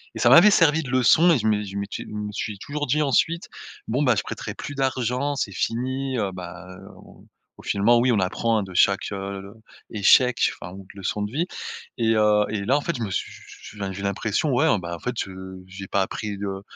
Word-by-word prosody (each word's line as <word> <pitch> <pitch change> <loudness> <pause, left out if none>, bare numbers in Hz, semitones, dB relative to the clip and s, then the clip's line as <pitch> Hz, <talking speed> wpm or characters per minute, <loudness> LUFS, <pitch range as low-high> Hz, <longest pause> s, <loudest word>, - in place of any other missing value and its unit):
et - - -5
ça - - +4
m'avait 200 +5 +8
servi 160 -4 +4
de 135 - -8
leçon 130 +7 +5
et 160 - +4
je 110 - -1
me 105 -1 +1
je 100 -1 -8
m'étais 100 0 -4
je - - -14
me 105 0 -4
suis 105 0 -4
toujours 145 +6 -4
dit 150 +4 +2
ensuite: 160 +4 +1 0.4
«Bon, 130 +6 +1
bah, 125 -4 +3
je - - -1
prêterai - - -6
plus 145 - -7
d'argent, 130 +1 -1
c'est 120 -6 -2
fini», 130 +6 -2
heu, 100 -4 -1
bah, 90 -1 -9 0.3
au - - -17 0.3
au - - -13
finalement, 115 +4 +3
oui, 125 +2 +2
on 105 - +2
apprend, 110 +5 0
hein, - - -2
de 95 -1 -9
chaque, 100 +3 +2
heu, 100 0 -6 0.4
échec 120 +4 +4 0.2
enfin 85 - -7
ou 95 0 -11
de - - -18
leçon 105 +2 -2
de 105 - -4
vie 155 +7 0 0.5
et 115 -1 +2
heu 105 -1 +4
et 105 -1 -3
là, 135 +6 +3
en - - -1
fait, 170 - -2
je 120 - -3
me 105 - -3
su - - -2
su - - -14
su - - -11
enfin, 95 -1 -2
j'ai 95 +1 -7
l'impression 100 +8 -1
ouais, 135 +6 +3
ben, 85 -1 -6
en - - -10
fait, 125 +5 -4
heu, 95 0 -9
j'ai 95 +1 -9
pas 100 - +1
appris, 105 +2 -3
heu, 95 -1 -4
110 Hz, 240 wpm, -24 LUFS, 100-130 Hz, 0.5 s, m'avait